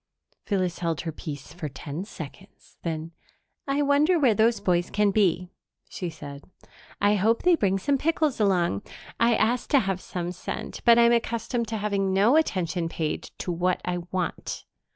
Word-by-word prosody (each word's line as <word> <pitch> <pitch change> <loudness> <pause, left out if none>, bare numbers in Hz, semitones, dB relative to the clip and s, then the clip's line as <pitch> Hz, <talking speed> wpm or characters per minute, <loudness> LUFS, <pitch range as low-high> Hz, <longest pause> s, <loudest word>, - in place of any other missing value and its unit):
Phyllis 185 -4 -1
held 165 -3 -1
her 165 - -4
peace 145 -3 -8
for 170 -3 -5
ten 145 +6 -6
seconds; 185 +1 -11
then, 165 -1 -4 0.6
"I 280 +1 +1
wonder 290 +5 +4
where 265 -8 +4
those 225 +2 +3
boys 175 -1 +1
can 210 -1 +2
be," 180 -3 +1 0.4
she 180 - -4
said. 145 -3 -9 0.6
"I 205 +1 +4
hope 220 +3 +2
they 360 - +5
bring 195 - +1
some 275 +8 0
pickles 310 -4 +1
along. 180 - +2 0.4
I 235 0 +4
asked 235 +3 +1
to 285 - +5
have 195 -2 -2
some 175 -1 -4
sent, 180 - -6
but 235 0 +7
I'm 235 0 +6
accustomed 235 0 0
to 225 - -3
having 200 -2 0
no 210 +8 +5
attention 180 - +1
paid 160 -2 -3
to 180 - -3
what 180 +1 0
I 180 0 -1
want." 180 -3 -3
195 Hz, 170 wpm, -26 LUFS, 175-235 Hz, 0.6 s, but